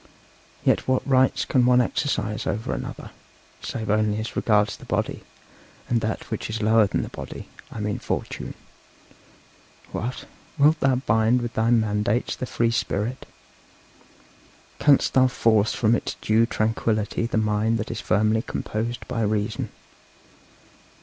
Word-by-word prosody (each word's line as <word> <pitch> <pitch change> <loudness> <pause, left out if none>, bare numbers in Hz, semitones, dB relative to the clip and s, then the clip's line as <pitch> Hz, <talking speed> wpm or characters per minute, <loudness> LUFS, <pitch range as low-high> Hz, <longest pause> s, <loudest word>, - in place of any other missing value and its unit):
Yet - - +2
what 130 0 +1
rights 130 -1 +3
can 130 - +2
one 125 0 +5
exercise 110 -4 -1
over 110 +2 -2
another, - - -6 0.5
save 110 -2 -3
only 105 0 +2
as 110 - -5
regards 105 -2 +2
the - - -14
body, - - -2 0.7
and 120 -1 +1
that 110 0 -3
which - - -3
is 110 +1 -3
lower 110 0 +4
than - - -1
the - - -6
body - - -8 0.2
I - - -7
mean 105 0 -2
fortune? - - -4 1.4
What! 125 +3 -4 0.3
wilt 155 +2 +4
thou 135 -1 +3
bind 115 0 +2
with 120 - -4
thy 110 +1 +1
mandates 110 0 +1
the 130 - -5
free 115 -1 +1
spirit? 115 +2 -2 1.5
Canst 145 -3 +4
thou 130 -1 +5
force 110 -3 +2
from 110 -1 +2
its 120 - -1
due 110 +2 +3
tranquillity 110 0 0
the 115 - -2
mind 110 +1 +1
that 105 - -4
is - - -4
firmly 110 +2 +2
composed 115 -1 -4
by 115 - -2
reason? 110 +1 -1
110 Hz, 145 wpm, -24 LUFS, 110-120 Hz, 1.5 s, one